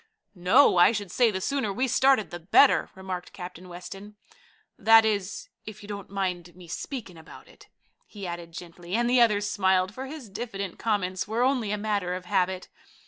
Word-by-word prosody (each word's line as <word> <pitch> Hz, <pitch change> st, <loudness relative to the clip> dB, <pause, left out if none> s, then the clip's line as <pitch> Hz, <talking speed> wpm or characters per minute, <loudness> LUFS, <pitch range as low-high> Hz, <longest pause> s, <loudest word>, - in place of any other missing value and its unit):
"No; 185 Hz, +5 st, +4 dB
I 175 Hz, -, +7 dB
should 205 Hz, -4 st, -4 dB
say 245 Hz, -2 st, +3 dB
the 190 Hz, -3 st, -3 dB
sooner 255 Hz, 0 st, -1 dB
we 255 Hz, +6 st, 0 dB
started 260 Hz, -2 st, +3 dB
the 175 Hz, -, -6 dB
better," 170 Hz, +3 st, +4 dB
remarked 190 Hz, -1 st, -6 dB
Captain 180 Hz, 0 st, -9 dB
Weston. 195 Hz, +4 st, -10 dB, 0.6 s
"That 225 Hz, 0 st, +6 dB
is, 205 Hz, -1 st, -2 dB, 0.2 s
if 215 Hz, -1 st, -9 dB
you -, -, -10 dB
don't 200 Hz, -2 st, -7 dB
mind 180 Hz, -3 st, -3 dB
me 180 Hz, -1 st, -14 dB
speaking 185 Hz, -, -6 dB
about 160 Hz, -, -14 dB
it," -, -, -18 dB, 0.4 s
he 205 Hz, -3 st, -9 dB
added 170 Hz, -1 st, -6 dB
gently, 175 Hz, +2 st, -7 dB
and 240 Hz, +1 st, +1 dB
the 245 Hz, 0 st, +4 dB
others 210 Hz, -3 st, +3 dB
smiled, 190 Hz, -1 st, +1 dB
for 265 Hz, +4 st, -6 dB
his 285 Hz, -4 st, -8 dB
diffident 200 Hz, -2 st, -6 dB
comments 190 Hz, -5 st, -1 dB
were 225 Hz, +3 st, 0 dB
only 250 Hz, -5 st, +1 dB
a 210 Hz, -, -1 dB
matter 205 Hz, -4 st, -1 dB
of 180 Hz, 0 st, -7 dB
habit. 185 Hz, +1 st, 0 dB
200 Hz, 185 wpm, -26 LUFS, 180-220 Hz, 0.6 s, I